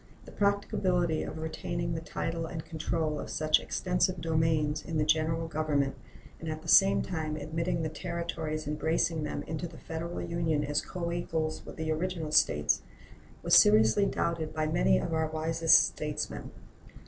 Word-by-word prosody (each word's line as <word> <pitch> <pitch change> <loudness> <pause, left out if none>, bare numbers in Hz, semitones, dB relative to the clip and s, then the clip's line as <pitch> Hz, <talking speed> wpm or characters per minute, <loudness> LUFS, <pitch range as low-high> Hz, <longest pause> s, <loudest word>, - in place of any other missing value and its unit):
The - - -12
practicability 185 -4 +1
of - - -5
retaining 170 +1 -3
the 160 - -3
title 165 0 -3
and 160 -1 -6
control 155 -1 -2
of - - -6
such 155 0 +2
extensive 180 0 0
domains 160 -2 +1
in 165 -2 -3
the 150 - +2
General 160 +1 +1
Government, 150 -3 0 0.5
and 160 - -5
at 155 0 -5
the - - -11
same 195 0 +6
time 155 -3 -3
admitting 160 +3 -2
the - - 0
Territories 165 -2 -4
embracing 160 +2 0
them - - -4
into 160 +2 -4
the 160 -1 -13
Federal 165 +1 -5
Union 165 -3 -1
as 145 +1 0
coequals 170 -3 -3
with - - -8
the 160 -1 -2
original 165 -1 -2
States, 150 - +3 0.6
was - - +4
seriously 110 - +6
doubted 165 -4 -2
by 155 0 0
many 65 - +3
of 110 - -2
our 160 0 +1
wisest 160 +1 +4
statesmen. 145 - -4
160 Hz, 160 wpm, -30 LUFS, 155-170 Hz, 0.6 s, same